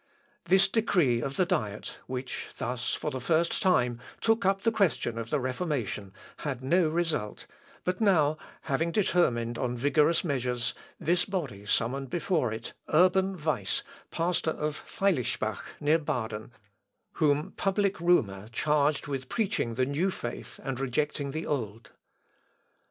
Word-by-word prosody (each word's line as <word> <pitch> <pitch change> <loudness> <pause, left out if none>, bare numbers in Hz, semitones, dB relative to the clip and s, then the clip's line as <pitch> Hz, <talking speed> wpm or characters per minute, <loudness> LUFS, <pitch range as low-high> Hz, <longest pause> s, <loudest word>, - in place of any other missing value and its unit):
This 190 +1 +5
decree 175 - +2
of 135 +2 -3
the 185 - +4
Diet, 130 - -2
which 130 0 -4
thus, 125 +1 -2
for 150 - -3
the 130 -2 -4
first 165 +6 +1
time, 125 -10 +3 0.2
took 225 -3 +2
up 195 0 +2
the 230 - +3
question 160 - +1
of 115 0 -5
the 150 - +1
Reformation, 130 - -2 0.3
had 135 -4 -4
no 170 +4 +3
result, 155 -10 -1 0.4
but 185 +4 -1
now 155 -8 +4 0.3
having 160 +4 0
determined 125 - +1
on 125 -1 -1
vigorous 150 +5 +3
measures, 125 -6 0 0.3
this 170 +2 +2
body 140 - -4
summoned 130 +5 0
before 170 - 0
it 110 - -6 0.2
Urban 185 +3 +4
Weiss, 150 -10 0 0.3
pastor 170 -1 0
of 150 -1 -2
Feilispach, 185 - 0 0.2
near 155 +3 +3
Baden, 110 -6 -3 0.7
whom 150 0 +3
public 200 -1 0
rumour 110 - +2
charged 150 +3 +2
with 135 -2 -4
preaching 200 - 0
the 130 +1 +2
new 145 +8 +1
faith 120 -10 -6
and 135 -2 -3
rejecting 140 +2 -1
the 155 +4 -4
old. 115 -6 -3
145 Hz, 140 wpm, -29 LUFS, 125-175 Hz, 0.7 s, This